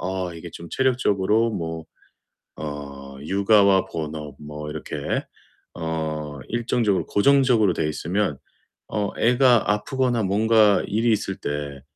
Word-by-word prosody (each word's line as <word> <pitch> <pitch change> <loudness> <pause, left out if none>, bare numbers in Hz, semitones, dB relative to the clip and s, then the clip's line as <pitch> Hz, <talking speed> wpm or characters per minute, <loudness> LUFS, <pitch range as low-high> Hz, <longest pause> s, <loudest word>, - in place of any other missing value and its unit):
아 95 0 -3
이게 85 +1 -9
좀 85 - -9
체력적으로 115 -4 +2
뭐 80 -4 -4 0.8
어 70 -2 -7
육아와 100 +2 +4
본업 75 -2 -6
뭐 75 0 -7
이렇게 - - -3 0.5
어 80 -3 -4
일정적으로 115 -4 0
고정적으로 125 -4 +4
되어 - - -1
있으면 85 +1 -1 0.5
어 105 -2 -1
애가 120 -1 +4
아프거나 120 +2 0
뭔가 105 +1 +4
일이 110 +4 +1
있을 95 -2 -1
때 70 -1 -5
95 Hz, 250 characters per minute, -23 LUFS, 75-110 Hz, 0.8 s, 육아와